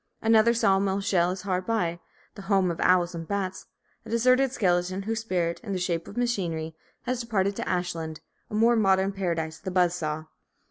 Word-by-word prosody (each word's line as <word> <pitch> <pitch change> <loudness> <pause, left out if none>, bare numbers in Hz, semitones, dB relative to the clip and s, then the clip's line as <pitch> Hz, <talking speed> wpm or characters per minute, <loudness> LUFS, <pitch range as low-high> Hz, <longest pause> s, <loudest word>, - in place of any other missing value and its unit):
Another 225 +1 +4
saw 195 -4 +3
mill 195 0 0
shell 180 -3 +2
is 185 +1 -4
hard 185 -2 -2
by, 175 -7 0 0.3
the - - -10
home 195 -2 +2
of 165 - -6
owls 180 -1 +3
and 165 -1 -6
bats, 195 -2 -3 0.4
a - - -12
deserted 255 +3 +3
skeleton, 185 -3 0
whose 225 +2 -2
spirit, 175 -6 -1
in 205 -4 -4
the - - -1
shape 170 -2 -2
of 210 - -10
machinery, 175 -10 -1 0.3
has 250 0 -2
departed 200 -4 0
to - - -3
Ashland, 165 -3 -2 0.3
a - - -5
more 230 +2 +4
modern 195 -2 +3
paradise 165 -5 -3
of - - -31
the 190 - -3
buzz 180 -2 +2
saw. 155 -3 -3
190 Hz, 195 wpm, -26 LUFS, 175-215 Hz, 0.4 s, Another